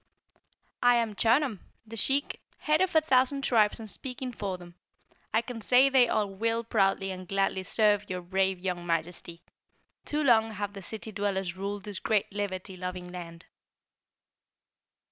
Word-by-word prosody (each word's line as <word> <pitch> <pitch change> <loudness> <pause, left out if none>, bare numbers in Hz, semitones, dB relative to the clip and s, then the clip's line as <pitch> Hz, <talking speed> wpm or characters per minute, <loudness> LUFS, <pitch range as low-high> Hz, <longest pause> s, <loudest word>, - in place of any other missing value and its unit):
"I 245 0 +6
am 230 -2 +1
Chunum, 230 +1 +2 0.3
the 225 +1 -9
Sheik, 275 +6 0 0.2
head 305 +2 +1
of 375 -2 +1
a 315 - +7
thousand 270 -1 +2
tribes 220 -4 +3
and 220 - -7
speaking 255 +3 -6
for 195 -5 -4
them, 175 -1 -13 0.6
I 225 +2 +2
can 235 -2 -7
say 255 +5 +5
they 255 -3 +5
all 215 -2 +1
will 230 +3 0
proudly 195 -4 +1
and 185 -1 -7
gladly 195 0 0
serve 210 +1 +2
your 180 -1 -3
brave 190 +1 +1
young 180 -1 -3
Majesty. 170 +1 -3 0.6
Too 300 +1 -1
long 225 -4 +4
have 205 -1 -4
the 200 - -8
city 220 +3 -7
dwellers 195 -3 -2
ruled 200 +1 -4
this 205 -2 -5
great 210 -2 0
liberty 195 -2 -4
loving 180 0 -6
land." 170 -2 -9
205 Hz, 160 wpm, -29 LUFS, 185-235 Hz, 0.6 s, a